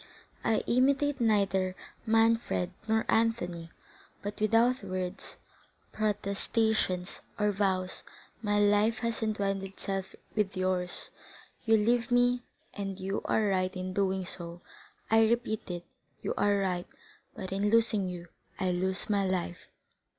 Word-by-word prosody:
I 225 Hz, -1 st, +2 dB
imitate 275 Hz, +2 st, +2 dB
neither 195 Hz, -4 st, +2 dB, 0.3 s
Manfred 225 Hz, -5 st, +3 dB, 0.2 s
nor 220 Hz, 0 st, +2 dB
Anthony; 180 Hz, -8 st, +1 dB, 0.5 s
but 205 Hz, +1 st, -5 dB
without 230 Hz, +3 st, +3 dB
words, 185 Hz, 0 st, -4 dB, 0.6 s
protestations, 210 Hz, -2 st, 0 dB, 0.2 s
or 210 Hz, 0 st, +2 dB
vows, 190 Hz, -2 st, 0 dB, 0.4 s
my 205 Hz, -2 st, +1 dB
life 205 Hz, +2 st, +4 dB
has 230 Hz, 0 st, -1 dB
entwined 200 Hz, -3 st, 0 dB
itself 195 Hz, 0 st, -4 dB, 0.2 s
with 205 Hz, -3 st, 0 dB
yours; 185 Hz, -1 st, 0 dB, 0.5 s
you 225 Hz, -1 st, +5 dB
leave 235 Hz, +3 st, +2 dB
me, 245 Hz, 0 st, +3 dB, 0.3 s
and 195 Hz, -1 st, -4 dB
you 195 Hz, +2 st, -2 dB
are 220 Hz, -, +2 dB
right 185 Hz, 0 st, 0 dB
in 185 Hz, 0 st, -4 dB
doing 190 Hz, -1 st, 0 dB
so,—I 175 Hz, +5 st, -2 dB
repeat 235 Hz, -3 st, -1 dB
it, 175 Hz, -1 st, -5 dB, 0.4 s
you -, -, -1 dB
are 205 Hz, 0 st, +3 dB
right; 180 Hz, -3 st, -1 dB, 0.5 s
but 190 Hz, -5 st, -6 dB
in 200 Hz, +2 st, +1 dB
losing 220 Hz, -4 st, +3 dB
you, 175 Hz, -1 st, -7 dB, 0.3 s
I 185 Hz, -1 st, +1 dB
lose 185 Hz, +2 st, 0 dB
my 205 Hz, -2 st, +2 dB
life. 185 Hz, -2 st, -2 dB
200 Hz, 125 wpm, -30 LUFS, 185-225 Hz, 0.6 s, you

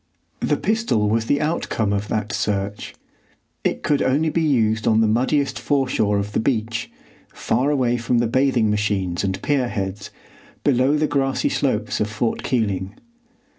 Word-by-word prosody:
The -, -, +1 dB
pistol 215 Hz, -, +1 dB
was 115 Hz, +2 st, 0 dB
the 145 Hz, -, +2 dB
outcome 135 Hz, -9 st, -1 dB
of 100 Hz, +1 st, -2 dB
that 105 Hz, -1 st, -2 dB
search. 100 Hz, 0 st, -2 dB, 0.7 s
It -, -, -1 dB
could 145 Hz, -2 st, +1 dB
only 150 Hz, +4 st, +1 dB
be 165 Hz, -, 0 dB
used 110 Hz, -8 st, +1 dB
on 110 Hz, -1 st, +4 dB
the 110 Hz, -, +4 dB
muddiest 130 Hz, +6 st, +1 dB
foreshore 130 Hz, -7 st, +1 dB
of 100 Hz, +1 st, -2 dB
the -, -, 0 dB
beach, 115 Hz, -1 st, -1 dB, 0.4 s
far 125 Hz, +5 st, 0 dB
away 125 Hz, -4 st, +1 dB
from 120 Hz, +1 st, 0 dB
the 120 Hz, -, +2 dB
bathing 125 Hz, -2 st, +2 dB
machines 100 Hz, -4 st, -1 dB
and 95 Hz, 0 st, -1 dB
pierheads, 105 Hz, -8 st, -1 dB, 0.5 s
below 135 Hz, +2 st, +3 dB
the 155 Hz, -, +2 dB
grassy 135 Hz, -3 st, 0 dB
slopes -, -, -1 dB
of 105 Hz, -, 0 dB
Fort 110 Hz, +2 st, -2 dB
Keeling. 100 Hz, -5 st, -1 dB
115 Hz, 155 wpm, -22 LUFS, 105-135 Hz, 0.7 s, on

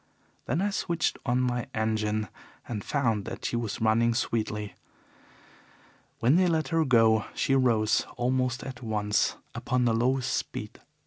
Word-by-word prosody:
Then 165 Hz, +8 st, 0 dB
I 205 Hz, -, 0 dB
switched 170 Hz, -4 st, -1 dB
on 125 Hz, +1 st, +2 dB
my 125 Hz, -1 st, -1 dB
engine 110 Hz, -1 st, 0 dB, 0.4 s
and 105 Hz, -4 st, -4 dB
found 115 Hz, -8 st, 0 dB
that 115 Hz, +1 st, -6 dB
she -, -, -1 dB
was 115 Hz, -3 st, -3 dB
running 115 Hz, +1 st, +3 dB
sweetly. 105 Hz, -3 st, -2 dB, 1.4 s
When 125 Hz, +8 st, +3 dB
they 185 Hz, 0 st, +4 dB
let 160 Hz, -2 st, 0 dB
her 165 Hz, -2 st, +2 dB
go 115 Hz, -4 st, +4 dB
she 135 Hz, -, +1 dB
rose 115 Hz, -5 st, +2 dB
almost 125 Hz, 0 st, 0 dB
at 130 Hz, -1 st, -8 dB
once 105 Hz, -3 st, 0 dB, 0.2 s
upon 125 Hz, 0 st, 0 dB
the 115 Hz, -, +3 dB
lowest 125 Hz, +3 st, +1 dB
speed. -, -, -4 dB
120 Hz, 145 wpm, -28 LUFS, 110-130 Hz, 1.4 s, they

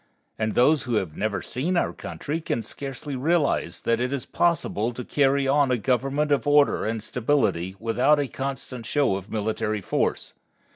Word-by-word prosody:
And 110 Hz, 0 st, -1 dB
those 145 Hz, +4 st, +4 dB
who 120 Hz, -2 st, -1 dB
have 90 Hz, -7 st, -1 dB
never 105 Hz, 0 st, -2 dB
seen 170 Hz, +8 st, -1 dB
our -, -, +1 dB
country 155 Hz, +3 st, -5 dB
can 120 Hz, -7 st, -2 dB
scarcely 140 Hz, +2 st, -6 dB
realize 150 Hz, +3 st, 0 dB
that 115 Hz, 0 st, +1 dB
it 125 Hz, +1 st, -1 dB
is 140 Hz, -3 st, -3 dB
possible 145 Hz, -9 st, 0 dB
to 125 Hz, +1 st, -6 dB
carry 140 Hz, -1 st, +2 dB
on 140 Hz, 0 st, +3 dB
a 125 Hz, -, +2 dB
government 135 Hz, +6 st, 0 dB
of 145 Hz, +1 st, +1 dB
order 145 Hz, -5 st, +4 dB
and 110 Hz, -1 st, -2 dB
stability 110 Hz, -7 st, 0 dB
without 125 Hz, +6 st, +3 dB
a 145 Hz, -, 0 dB
constant 130 Hz, -3 st, -5 dB
show 140 Hz, -8 st, +2 dB
of 100 Hz, +2 st, -7 dB
military 110 Hz, 0 st, -1 dB
force. -, -, -1 dB
130 Hz, 175 wpm, -25 LUFS, 110-145 Hz, -, those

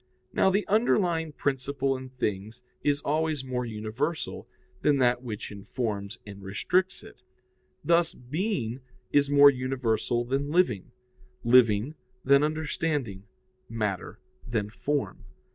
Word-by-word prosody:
Now -, -, +4 dB
the 200 Hz, +2 st, +1 dB
underlying 180 Hz, -7 st, +2 dB
principle 135 Hz, -1 st, -1 dB
in 130 Hz, 0 st, -7 dB
things 110 Hz, -1 st, -4 dB, 0.2 s
is 145 Hz, 0 st, +1 dB
always 155 Hz, -1 st, 0 dB
more 125 Hz, -2 st, -3 dB
universal 115 Hz, +9 st, -3 dB, 0.3 s
than 145 Hz, -1 st, +3 dB
that 125 Hz, -1 st, +3 dB
which 110 Hz, -5 st, -6 dB
informs 100 Hz, 0 st, -4 dB
and 100 Hz, -1 st, -10 dB
restricts 180 Hz, -, 0 dB
it; -, -, -14 dB, 0.6 s
thus, 170 Hz, -1 st, +3 dB
being 130 Hz, -, -2 dB, 0.3 s
is 145 Hz, -1 st, +3 dB
more 145 Hz, 0 st, +8 dB
universal 125 Hz, -2 st, -1 dB
than 135 Hz, +3 st, -1 dB
living, 150 Hz, -, +1 dB, 0.5 s
living 120 Hz, +1 st, +4 dB, 0.3 s
than 140 Hz, +1 st, +6 dB
understanding, 150 Hz, -, -2 dB, 0.4 s
matter 105 Hz, -5 st, -3 dB, 0.3 s
than 110 Hz, -3 st, -2 dB
form. 145 Hz, +4 st, -2 dB
130 Hz, 115 wpm, -27 LUFS, 115-150 Hz, 0.6 s, more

